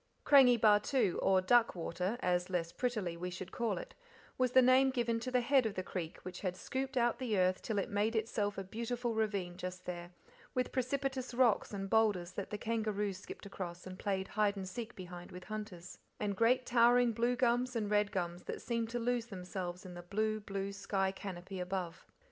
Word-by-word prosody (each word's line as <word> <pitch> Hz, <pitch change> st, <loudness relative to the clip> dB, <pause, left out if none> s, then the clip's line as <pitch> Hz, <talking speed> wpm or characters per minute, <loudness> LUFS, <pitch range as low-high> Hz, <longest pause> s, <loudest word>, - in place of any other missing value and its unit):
Krangi 255 Hz, -4 st, +7 dB
Bahtoo 210 Hz, 0 st, +3 dB
or 190 Hz, -1 st, +4 dB
Duck 235 Hz, +4 st, +4 dB
Water, 180 Hz, +5 st, -2 dB
as, 180 Hz, 0 st, +1 dB
less 170 Hz, -2 st, -1 dB
prettily, 215 Hz, -9 st, -2 dB
we 180 Hz, +2 st, -4 dB
should 180 Hz, +1 st, -7 dB
call 235 Hz, -2 st, -1 dB
it -, -, -7 dB, 0.4 s
was 255 Hz, -1 st, +1 dB
the 260 Hz, -, +8 dB
name 260 Hz, +2 st, +6 dB
given 235 Hz, -3 st, 0 dB
to 245 Hz, +3 st, -4 dB
the 250 Hz, -1 st, +2 dB
head 260 Hz, -1 st, +4 dB
of 210 Hz, -, -5 dB
the 185 Hz, -, -2 dB
creek, 175 Hz, -3 st, -5 dB
which 180 Hz, 0 st, -7 dB
had 185 Hz, -2 st, -2 dB
scooped 265 Hz, +4 st, -3 dB
out 240 Hz, 0 st, +2 dB
the 235 Hz, -6 st, 0 dB
earth 185 Hz, 0 st, +2 dB
till 220 Hz, -, -2 dB
it 195 Hz, -, 0 dB
made 210 Hz, +3 st, 0 dB
itself 210 Hz, -2 st, -1 dB
a 195 Hz, -, -3 dB
beautiful 235 Hz, +4 st, -3 dB
ravine 200 Hz, -5 st, -1 dB
just 185 Hz, 0 st, -6 dB
there, 175 Hz, -1 st, -5 dB, 0.5 s
with 255 Hz, -1 st, 0 dB
precipitous 260 Hz, 0 st, -2 dB
rocks 240 Hz, -4 st, +3 dB
and 195 Hz, -2 st, -4 dB
boulders 210 Hz, -6 st, +3 dB
that 200 Hz, -, -5 dB
the 210 Hz, -, -3 dB
kangaroos 210 Hz, -3 st, -1 dB
skipped 205 Hz, -, -10 dB
across 180 Hz, -3 st, -6 dB
and 185 Hz, 0 st, -8 dB
played 190 Hz, -1 st, -1 dB
hide 210 Hz, -1 st, +1 dB
and 190 Hz, -1 st, -4 dB
seek 230 Hz, +4 st, -6 dB
behind 180 Hz, -1 st, -9 dB
with 180 Hz, 0 st, -9 dB
hunters, 210 Hz, -5 st, -7 dB, 0.2 s
and 205 Hz, -1 st, -1 dB
great 245 Hz, +4 st, +3 dB
towering 240 Hz, 0 st, +5 dB
blue 235 Hz, +2 st, +1 dB
gums 245 Hz, 0 st, +1 dB
and 210 Hz, -3 st, -1 dB
red 210 Hz, -1 st, +3 dB
gums, 175 Hz, -1 st, -3 dB
that -, -, -4 dB
seemed 230 Hz, -2 st, -2 dB
to 240 Hz, -, -2 dB
lose 240 Hz, 0 st, 0 dB
themselves 180 Hz, -2 st, -5 dB
in 180 Hz, -, -8 dB
the 175 Hz, -, -7 dB
blue, 215 Hz, +4 st, -1 dB
blue 200 Hz, -1 st, -4 dB
sky 195 Hz, -1 st, 0 dB
canopy 190 Hz, -1 st, -7 dB
above. 180 Hz, -1 st, -4 dB
210 Hz, 200 wpm, -34 LUFS, 185-240 Hz, 0.5 s, the